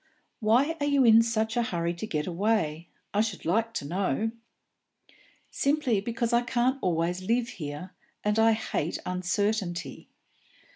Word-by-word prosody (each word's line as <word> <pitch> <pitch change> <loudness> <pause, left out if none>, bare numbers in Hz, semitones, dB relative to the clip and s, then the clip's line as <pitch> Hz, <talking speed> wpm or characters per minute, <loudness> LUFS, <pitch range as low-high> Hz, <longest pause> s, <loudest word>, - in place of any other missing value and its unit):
"Why 250 +9 +2
are 290 - 0
you 280 -2 +4
in 225 0 +8
such 225 -1 0
a 240 - +2
hurry 170 -6 -1
to 175 +5 -6
get 150 -6 -2
away, 175 -4 -1 0.2
I 205 - +3
should 215 -3 -3
like 225 +7 +1
to 140 - -3
know?" 190 +4 0 1.2
"Simply 275 -7 +1
because 235 +2 -2
I 235 - +5
can't 250 +2 0
always 175 +1 0
live 235 +5 0
here, 150 +1 -7 0.3
and 210 +1 +1
I 225 0 +5
hate 195 -7 -2
uncertainty." 180 -1 -2
215 Hz, 145 wpm, -28 LUFS, 175-230 Hz, 1.2 s, in